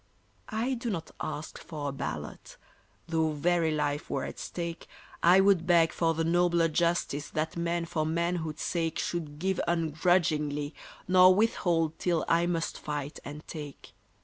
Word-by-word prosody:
I 230 +5 -1
do 235 -1 -3
not 165 -6 -4
ask 155 - -5
for 150 -3 -5
a - - -3
ballot; 135 - -6 0.5
Though 160 -2 +1
very 165 +2 +2
life 150 -1 -1
were - - -1
at - - -6
stake, 170 -1 -5 0.3
I 180 +3 +6
would 190 -4 +3
beg 165 -2 +4
for 165 -1 +1
the 165 - 0
nobler 170 0 +3
justice 170 -3 0
That 155 +1 -2
men 170 0 -1
for 160 -2 -1
manhood's 160 -1 -1
sake 165 -2 -1
Should 155 -4 -3
give 190 +3 0
ungrudgingly, 155 -3 +1 0.3
nor 185 0 +7
withhold 170 -7 +1
till 170 -3 +1
I 170 +1 +3
must 165 -2 -2
fight 145 -1 -4
and 150 +2 -9
take. 150 -3 -8
165 Hz, 150 wpm, -29 LUFS, 155-175 Hz, 0.5 s, nor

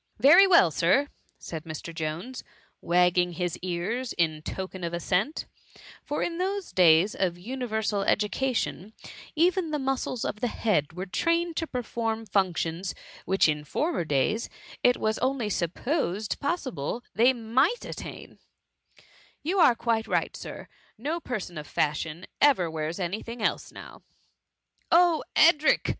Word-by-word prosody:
*" - - -48
" - - -44
Very 390 +6 +9
well, 340 - +6
Sir,'' 185 - +2 0.3
said 160 -2 -7
Mr. 165 +1 -7
Jones, 165 +11 -5 0.4
wagging 180 0 +2
his 175 -1 -2
ears 185 +8 -3
in 160 -3 0
token 190 +2 -6
of 170 0 -2
assent; 195 - -1 0.6
for 295 - -2
in 340 0 -3
those 390 0 -2
days 175 +2 +5
of 175 -2 -1
universal 220 -1 -2
education, 210 0 -1 0.4
even 345 +1 +2
the 305 - -1
muscles 265 -3 -2
of 210 - -3
the 245 - 0
head 195 -10 0
were 180 +2 -5
trained 335 - 0
to 325 - -1
perform 225 -3 -3
functions 185 -2 -1 0.3
which 190 -1 +3
in 150 -1 -1
former 305 - -1
days 155 - 0 0.3
it 245 0 +4
was 215 0 -1
only 255 -5 0
supposed 200 - -1
possible 260 - -3
they 240 +4 +5
might 255 - +1
attain: - - -8 0.5
" - - -28
You 365 +6 0
are 255 -8 +6
quite 225 -1 0
right. - - 0
Sir, - - -8 0.2
— - - -34
no 330 +3 -1
person 205 - -5
of 150 - -9
fashion 155 +3 -2 0.2
ever 215 - +4
wears 160 +2 -3
any 185 +4 -2
thing 230 +1 -8
else - - -1
now - - -12 0.4
.'' - - -57
" - - -43
Oh, 340 -3 +1
Edric 310 -1 +5
215 Hz, 150 wpm, -27 LUFS, 175-270 Hz, 0.6 s, Very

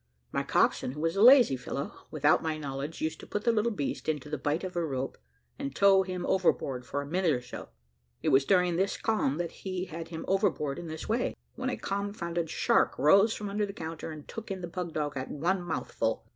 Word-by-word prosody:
My - - 0
coxswain, 125 - +1
who 150 - -8
was 165 +3 0
a 195 - +1
lazy 245 - +8
fellow, 135 +2 -5 0.2
without 150 0 +3
my 160 -1 -2
knowledge, 145 +1 -5
used 160 0 -2
to - - -11
put 210 - -3
the 235 - +4
little 230 +1 +1
beast 160 -5 -3
into 150 -1 -2
the 150 - -1
bight 145 +6 -1
of 185 -1 -5
a 175 - +1
rope, 135 -4 -3 0.4
and 140 -1 -4
tow 195 -1 +6
him 185 -1 -3
overboard 135 -9 +1
for 140 0 -2
a - - -8
minute 175 +4 +1
or 125 - -1
so. 125 - -8 0.5
It - - +2
was 135 +1 +5
during 180 +1 +3
this 195 +2 +1
calm 210 -11 0
that 170 -1 -2
he 185 -1 -4
had 165 -1 -7
him 165 -1 -6
overboard 185 -7 +1
in 175 - -7
this 160 0 -6
way, 230 +3 0 0.2
when 260 - -3
a - - -2
confounded 185 -5 -3
shark - - +2
rose 200 +8 +5
from 210 - -5
under 205 +1 -1
the 200 - -7
counter, 165 -3 -6
and 155 -2 -9
took 225 -1 -7
in 190 -1 -4
the 175 - -4
pug 175 0 -4
dog 150 -1 -2
at 130 -1 -4
one 180 +6 0
mouthful. 175 - -2
170 Hz, 225 wpm, -29 LUFS, 150-195 Hz, 0.5 s, lazy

